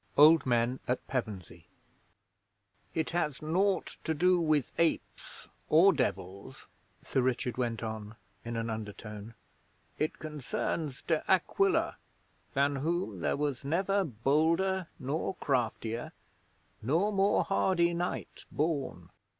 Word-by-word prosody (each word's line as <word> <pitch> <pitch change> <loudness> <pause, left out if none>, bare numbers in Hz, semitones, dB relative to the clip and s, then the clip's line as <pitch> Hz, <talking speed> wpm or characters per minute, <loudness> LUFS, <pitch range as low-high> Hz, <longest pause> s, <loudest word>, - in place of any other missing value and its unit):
OLD 155 -1 +7
MEN 120 +1 +2
AT 125 0 -1
PEVENSEY 110 -9 -5 1.3
'It 160 - 0
has 150 -5 -1
naught 185 +4 +1
to 160 - -1
do 180 +2 +4
with 155 -5 +1
apes 165 -1 -1 0.2
or 180 +5 +7
Devils,'Sir 100 - -4
Richard 125 -1 -1
went 120 -2 -1
on, 110 -1 -5 0.3
in 115 0 -4
an 115 0 -2
undertone. 105 0 -7 0.6
'It 155 - -1
concerns 150 -1 -3
De 160 -2 0
Aquila, 380 - +2 0.6
than 140 +1 +2
whom 155 - -1
there 75 -4 0
was 145 -3 -2
never 195 +7 +1
bolder 160 - +1
nor 155 +7 -2
craftier, 120 -4 -1 0.7
nor 165 - +2
more 195 +1 +3
hardy 180 -3 +2
knight 175 +1 -4
born. 140 - -2
145 Hz, 110 wpm, -31 LUFS, 115-170 Hz, 1.3 s, OLD